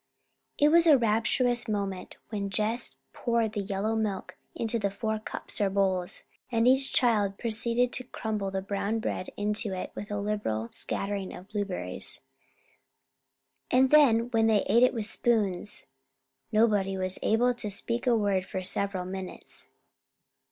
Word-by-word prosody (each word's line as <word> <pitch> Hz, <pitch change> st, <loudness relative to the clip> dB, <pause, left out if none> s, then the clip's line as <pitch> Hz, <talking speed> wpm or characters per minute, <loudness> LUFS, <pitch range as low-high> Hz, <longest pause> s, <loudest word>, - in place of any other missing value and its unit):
It 295 Hz, -, +5 dB
was 335 Hz, +1 st, +5 dB
a 300 Hz, -3 st, +8 dB
rapturous 240 Hz, +2 st, +1 dB
moment 200 Hz, -3 st, -3 dB
when 200 Hz, -2 st, -3 dB
Jess 215 Hz, +4 st, -1 dB, 0.2 s
poured 230 Hz, -3 st, 0 dB
the 205 Hz, -, -1 dB
yellow 200 Hz, +3 st, -1 dB
milk 210 Hz, -4 st, -2 dB, 0.2 s
into 230 Hz, 0 st, -1 dB
four 220 Hz, +2 st, -2 dB
cups 215 Hz, -, -6 dB
or 200 Hz, -, +3 dB
bowls, 190 Hz, -2 st, 0 dB, 0.3 s
and 230 Hz, 0 st, +3 dB
each 265 Hz, +1 st, +4 dB
child 210 Hz, -5 st, +2 dB
proceeded 235 Hz, +2 st, 0 dB
to 255 Hz, -, -3 dB
crumble 215 Hz, -5 st, -3 dB
the 190 Hz, 0 st, -3 dB
brown 200 Hz, +2 st, -1 dB
bread 215 Hz, -4 st, -3 dB
into 210 Hz, 0 st, -1 dB
it 185 Hz, -, -5 dB
with 205 Hz, -, -7 dB
a 205 Hz, -, -2 dB
liberal 200 Hz, -, -2 dB
scattering 195 Hz, -1 st, -3 dB
of 185 Hz, +3 st, -12 dB
blueberries. 195 Hz, -, -3 dB, 1.5 s
And 260 Hz, +1 st, +4 dB
then 245 Hz, -6 st, +5 dB
when 225 Hz, -2 st, +3 dB
they 215 Hz, -2 st, +3 dB
ate 235 Hz, -, +3 dB
it 250 Hz, 0 st, +4 dB
with 220 Hz, -2 st, 0 dB
spoons! 210 Hz, -4 st, 0 dB, 0.7 s
Nobody 210 Hz, -3 st, +3 dB
was 185 Hz, 0 st, -1 dB
able 245 Hz, +3 st, +3 dB
to 230 Hz, -3 st, -5 dB
speak 235 Hz, +5 st, -3 dB
a 240 Hz, -2 st, +5 dB
word 200 Hz, -3 st, +1 dB
for 185 Hz, 0 st, -5 dB
several 190 Hz, 0 st, -1 dB
minutes. 190 Hz, 0 st, -6 dB
210 Hz, 150 wpm, -28 LUFS, 195-235 Hz, 1.5 s, a